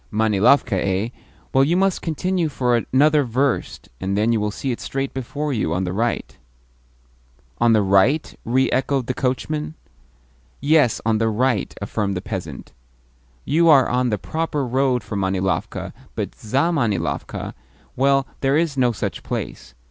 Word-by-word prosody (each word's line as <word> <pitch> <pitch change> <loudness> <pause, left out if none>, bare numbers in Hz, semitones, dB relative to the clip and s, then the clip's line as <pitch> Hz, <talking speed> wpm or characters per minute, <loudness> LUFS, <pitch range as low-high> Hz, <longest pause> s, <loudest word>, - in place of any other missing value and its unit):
"Manilovka, 110 0 +3
eh? 95 +4 0 0.4
Well, 135 - +5
you 165 +6 +2
must 195 -1 +1
continue 175 +1 -1
for 125 -3 +1 0.2
another 150 +3 +4
verst, 130 +2 -1
and 95 +5 -2
then 110 +3 +2
you 110 - +1
will 105 0 0
see 130 +5 -3
it 120 - -4
straight 135 0 -3
before 140 +3 -3
you, 85 -8 -1
on 90 - 0
the 90 -1 -3
right." 115 +4 -2 1.2
"On 120 -1 +4
the 110 -2 +4
right?" 100 +11 +3
re 130 +3 +2
echoed 135 0 0
the 130 - -2
coachman. 150 +5 -2 0.8
"Yes, 145 -4 +3
on 110 -1 +2
the 115 0 +2
right," 120 0 0
affirmed 100 -2 -2
the - - -1
peasant. 90 -8 -6 0.7
"You 165 +3 +3
are 140 -4 +6
on 125 0 +1
the 105 - 0
proper 155 - -2
road 130 -1 +1
for 105 0 -6
Manilovka, 95 -1 -2 0.2
but - - -3
ZAmanilovka 120 - -1 0.4
well, 135 +1 +3
there 135 +1 +2
is 160 -3 0
no 125 -2 +3
such 110 - -4
place. 65 0 -6
125 Hz, 155 wpm, -21 LUFS, 105-140 Hz, 1.2 s, are